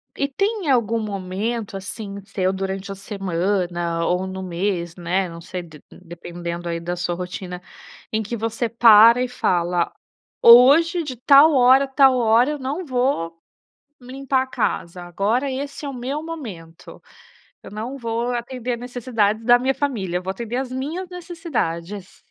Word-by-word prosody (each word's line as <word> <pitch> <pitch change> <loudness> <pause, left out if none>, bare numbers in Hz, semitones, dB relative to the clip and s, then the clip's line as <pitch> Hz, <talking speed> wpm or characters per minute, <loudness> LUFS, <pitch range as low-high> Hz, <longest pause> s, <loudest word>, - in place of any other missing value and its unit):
e 280 - -1
tem 395 +3 -2
algum 230 -3 +2
momento 205 +2 -4
assim, 200 +1 -6
seu 190 -1 -1
durante 195 +1 -4
a - - -5
semana, 180 -3 -2
ou 180 +1 0
no 190 0 -6
mês, 175 -1 -3
né, 180 +2 -1
não 170 0 -10
sei 180 0 -6
de 155 -3 -15
dependendo 170 0 -7
aí 170 0 -2
da 175 +1 -4
sua 175 0 -2
rotina, 180 0 -6 0.5
em 220 0 0
que 230 +3 -5
você 225 +1 -2
para 230 +1 +7
e - - -1
fala: 175 -7 0 0.5
"Hoje 290 +9 +7
de 260 -4 -6
tal 280 +5 +6
hora, 260 +1 +5
a - - -11
tal 270 -1 +4
hora 235 +4 +3
eu 295 - -4
não 285 +7 -4
vou 245 - -1 0.6
limpar 260 +1 -1
a - - -10
casa, 180 -8 -3
agora 210 +10 -1
esse 280 +2 -5
é - - -3
o 275 - -6
meu 260 +5 -4
momento, 210 - -9 0.6
eu - - -11
não 230 +6 -5
vou 235 0 -2
atender 245 0 -4
a - - -3
necessidades 230 -3 -1
da 245 0 +7
minha 265 +2 0
família, 200 -12 -2
vou 190 +1 -3
atender 235 +4 -5
às 260 -1 -3
minhas 310 +8 -4
necessidades". 215 - -5
225 Hz, 160 wpm, -21 LUFS, 185-260 Hz, 0.6 s, para